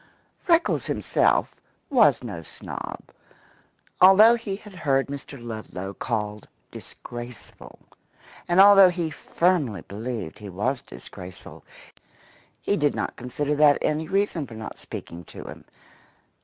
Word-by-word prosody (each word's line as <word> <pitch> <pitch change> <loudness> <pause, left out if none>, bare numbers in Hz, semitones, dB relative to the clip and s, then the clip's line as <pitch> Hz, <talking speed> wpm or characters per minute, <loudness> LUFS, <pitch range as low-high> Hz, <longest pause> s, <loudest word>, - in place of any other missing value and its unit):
Freckles 340 -1 +1
himself - - +1 0.4
was 215 - +4
no 100 -8 -6
snob. 80 - -8 1.0
Although 195 +5 +8
he 225 -4 -3
had 210 0 -13
heard 140 -6 +1
Mr. 140 -1 -8
Ludlow 110 -5 -7
called 105 -2 -4 0.2
disgraceful, 120 -5 -10 0.7
and 175 +1 +2
although 195 -1 +9
he 170 -3 -3
firmly 150 - 0
believed 110 -3 -6
he 105 -1 -8
was 120 +8 -2
disgraceful, 90 +9 -11 1.0
he 205 - 0
did 145 -2 +1
not - - -3
consider 140 +4 -3
that 150 -1 +6
any 155 +1 0
reason 190 -5 0
for 115 - -11
not 110 0 -8
speaking 85 +1 -8
to - - -10
him. - - -11
140 Hz, 120 wpm, -25 LUFS, 110-180 Hz, 1.0 s, although